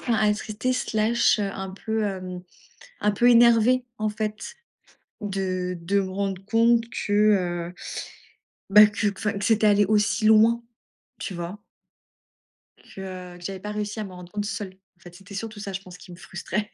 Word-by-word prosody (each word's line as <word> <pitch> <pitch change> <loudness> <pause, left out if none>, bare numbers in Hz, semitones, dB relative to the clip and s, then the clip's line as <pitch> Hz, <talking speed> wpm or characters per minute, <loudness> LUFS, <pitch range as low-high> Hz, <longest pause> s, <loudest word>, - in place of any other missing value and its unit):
enfin 235 - 0
attristée, 215 +3 0
slash, 230 -2 +2
un 195 -2 -3
peu, 220 +3 -3
hem, 185 -3 -4 0.6
un 210 - +2
peu 240 +4 +4
énervée 240 +1 +5
en 215 0 0
fait 215 - -5 0.7
de 185 -2 -2
de 195 +4 +1
me 190 -1 -3
rendre 195 -1 -3
compte 230 +2 +3
que, 210 - -4 0.6
heu, - - -24 1.0
bah, 210 +2 +9
que 210 0 -1
enfin, 210 +2 -1
que 200 -1 -3
c'était 220 0 +3
allé 205 0 +4
aussi 215 +1 +2
loin, 220 +2 +5 0.6
tu 190 - -5
vois? 175 +3 -6 1.2
Que, - - -13 0.3
heu, 175 - -13
que 175 - -14
j'avais 190 0 -5
pas 210 - -6
réussi 210 +1 -4
à - - -3
me 195 - -9
rendre 180 -1 -11
compte 205 -1 -3
seule. 200 -3 -5 0.2
En - - -35
fait, 175 +1 -13
c'était 195 +2 -13
surtout 215 +1 -6
ça, 200 -1 -5
je 190 - -4
pense, 180 -1 -13
qui 180 - -13
me 175 - -10
frustrait. 200 +3 -4
210 Hz, 175 wpm, -25 LUFS, 190-220 Hz, 1.2 s, bah